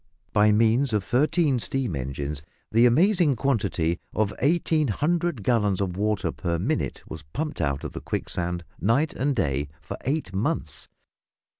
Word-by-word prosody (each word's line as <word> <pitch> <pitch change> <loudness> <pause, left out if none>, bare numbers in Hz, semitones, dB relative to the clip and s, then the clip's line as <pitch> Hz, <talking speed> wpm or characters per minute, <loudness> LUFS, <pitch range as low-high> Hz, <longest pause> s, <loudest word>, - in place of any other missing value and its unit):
By 105 0 +5
means 115 +4 +3
of 105 -3 +1
thirteen 135 - +2
steam 125 - -2
engines, 70 +2 -4 0.3
the 115 +2 +6
amazing 170 - +4
quantity 100 - 0 0.2
of 105 -1 +1
1800 155 - +1
gallons 105 -4 +2
of 95 -3 -1
water 100 -3 0
per 85 -1 -2
minute - - -2
was 80 - -7
pumped 150 - -3
out 70 -3 -1
of - - -4
the - - -7
quicksand 90 0 -3 0.2
night 130 - +2
and 140 +2 0
day 70 - 0
for 75 - -7
eight 140 -7 -2
months. 95 +3 -2
110 Hz, 145 wpm, -25 LUFS, 90-140 Hz, 0.3 s, the